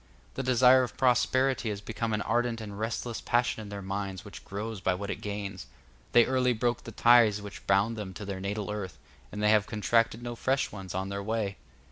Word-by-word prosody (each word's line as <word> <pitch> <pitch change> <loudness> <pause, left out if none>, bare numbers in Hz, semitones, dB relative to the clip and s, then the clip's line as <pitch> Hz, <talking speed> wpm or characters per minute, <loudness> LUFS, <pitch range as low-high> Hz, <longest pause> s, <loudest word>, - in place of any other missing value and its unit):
The - - -3
desire 130 0 +5
of 125 - -4
prosperity 130 -1 +2
is 105 -1 -3
become 115 +2 -3
an 105 0 0
ardent 120 -1 0
and 105 -2 -7
restless 115 +1 -3
passion 120 -2 +1
in 105 - -9
their 100 -1 -6
minds 95 0 -4
which 100 - -10
grows 105 +1 -5
by 95 -1 +1
what 100 +2 -4
it - - -6
gains. 100 -2 -5 0.5
They 120 -1 +7
early 130 -1 +2
broke 120 +1 -1
the - - -7
ties 115 -4 +5
which 100 -1 -10
bound 100 +4 +3
them 105 -3 -5
to 105 - -6
their 100 -1 -4
natal 100 +1 -3
earth, 100 -4 -5 0.3
and 105 0 -4
they 105 - +4
have 105 -1 +4
contracted 115 +2 +1
no 120 0 -4
fresh 130 +3 0
ones 95 -3 -7
on 95 +1 -2
their 100 0 -3
way. 105 -2 -2
110 Hz, 210 wpm, -29 LUFS, 100-120 Hz, 0.5 s, They